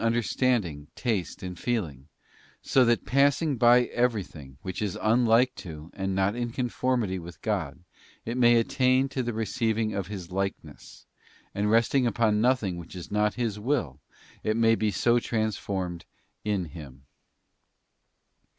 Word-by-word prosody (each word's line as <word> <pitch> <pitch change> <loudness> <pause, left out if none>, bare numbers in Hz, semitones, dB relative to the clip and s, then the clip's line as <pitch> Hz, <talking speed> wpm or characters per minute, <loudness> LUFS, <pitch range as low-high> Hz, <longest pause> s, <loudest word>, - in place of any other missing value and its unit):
67 115 0 +2
understanding, 110 - 0
taste, 105 -10 -2
and 90 -1 -6
feeling, 80 - -3 0.6
so 130 - +4
that 120 0 +2
passing 140 +2 +2
by 120 +1 +6
every 120 -4 0
thing 70 -6 -13
which 95 +1 -5
is 105 -4 -2
unlike 120 +2 +3
to, 80 -3 -9
and 95 -1 -2
not 95 +2 +1
in 120 0 -2
conformity 120 -5 -1
with 85 -1 -10
God, 90 -7 -2 0.4
it 115 - -3
may 120 -1 +5
attain 130 +3 +2
to 135 -1 -2
the 120 -1 -2
receiving 110 0 -1
of 100 -3 -3
His 95 -4 -7
likeness, 95 +1 -5 0.5
and 105 +1 0
resting 120 +3 +3
upon 110 -2 +2
nothing 115 -7 +1
which 85 +1 -10
is 90 - -8
not 105 0 +1
His 115 -4 -2
will, 115 - -1 0.4
it 110 +1 0
may 115 -1 +4
be 110 -1 +1
so 120 +5 +2
trans 110 -2 -1
formed 90 -3 -4 0.4
in 100 -4 -1
Him. 70 -4 -11
110 Hz, 150 wpm, -27 LUFS, 95-120 Hz, 0.6 s, by